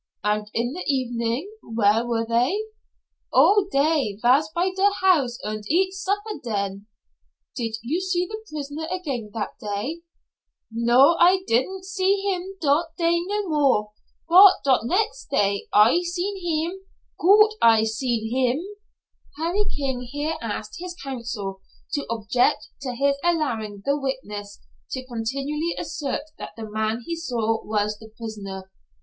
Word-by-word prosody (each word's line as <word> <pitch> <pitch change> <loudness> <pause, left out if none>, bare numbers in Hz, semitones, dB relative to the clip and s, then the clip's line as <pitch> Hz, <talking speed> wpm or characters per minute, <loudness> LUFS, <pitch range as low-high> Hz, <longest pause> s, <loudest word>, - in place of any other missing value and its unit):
"And 210 0 0
in 240 +3 0
the 360 - -5
evening 245 +2 -1
where 225 0 +2
were 230 -1 0
they?" 245 - +2 0.7
"Oh, 410 -1 +5
dey 280 -7 +1
vas 265 +7 +4
by 350 +4 0
der 390 +1 +4
house 295 -11 +3
und 215 0 -4
eat 375 +3 +2
supper 405 +2 -3
den." 200 -3 -3 0.7
"Did 230 -4 -2
you 310 +10 -1
see 365 -1 0
the 435 +4 -7
prisoner 300 +1 -5
again 280 -12 -3
that 215 - -4
day?" 215 +11 -4 0.7
"No, 240 +8 +5
I 370 +2 +5
didn' 370 +11 0
see 380 0 +1
heem 390 -1 -3
dot 305 +2 +2
day 340 0 +2
no 410 0 -1
more, 275 -9 +2 0.4
bot 375 +3 +9
dot 260 -4 +3
next 440 - 0
day 200 0 +1
I 215 +10 +6
seen 355 +3 -2
heem 345 +1 -2 0.4
goot 425 +4 +6
I 225 -1 +6
seen 220 0 -1
heem." 260 +5 +1 0.7
Harry 345 +7 0
King 265 -3 -2
here 295 +3 -2
asked 215 -1 -5
his 360 0 -6
counsel 230 - -5 0.3
to 285 - -2
object 225 0 +1
to 255 -3 -4
his 280 +2 +2
allowing 230 -12 -1
the 280 - +2
witness 210 -7 -5 0.3
to 260 -1 -4
continually 275 +7 -2
assert 285 -1 -3 0.2
that - - -7
the 220 -1 -6
man 220 +2 -2
he 335 - -3
saw 230 -8 -1
was 210 0 -1
the 220 - -12
prisoner. 195 -4 -7
270 Hz, 145 wpm, -24 LUFS, 225-345 Hz, 0.7 s, bot